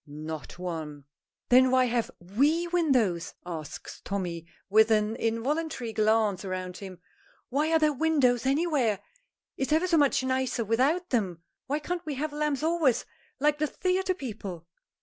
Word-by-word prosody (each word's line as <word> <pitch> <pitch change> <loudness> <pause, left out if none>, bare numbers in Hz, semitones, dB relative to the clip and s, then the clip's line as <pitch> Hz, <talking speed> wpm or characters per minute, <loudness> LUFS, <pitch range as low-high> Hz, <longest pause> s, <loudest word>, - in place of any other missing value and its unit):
"Not 155 +2 -7
one." 160 -5 -5 0.5
"Then 255 +1 +6
why 255 0 +4
have 240 -1 0
we 280 - +1
windows?" 255 - +1
asks 160 -4 -7
Tommy, 175 -4 -4 0.2
with 215 +2 +5
an 215 0 +2
involuntary 240 +2 -2
glance 215 -3 +2
round 185 -1 -4
him. 190 -2 -9 0.5
"Why 295 +5 +1
are 325 - +5
there 305 -1 +3
windows 265 -5 +2
anywhere? 275 - +1 0.6
It's 270 - -2
ever 320 +4 +3
so 345 -2 +3
much 285 -3 +3
nicer 260 -3 0
without 275 - +1
them. 185 -9 -1 0.2
Why 285 +2 0
can't 345 +3 -4
we 300 -3 -4
have 295 +2 -3
lamps 300 -1 -1
always, 320 -6 +2 0.3
like 295 +1 +2
the 305 - +1
theatre 370 +3 0
people?" 205 - -7
250 Hz, 150 wpm, -28 LUFS, 195-300 Hz, 0.6 s, Then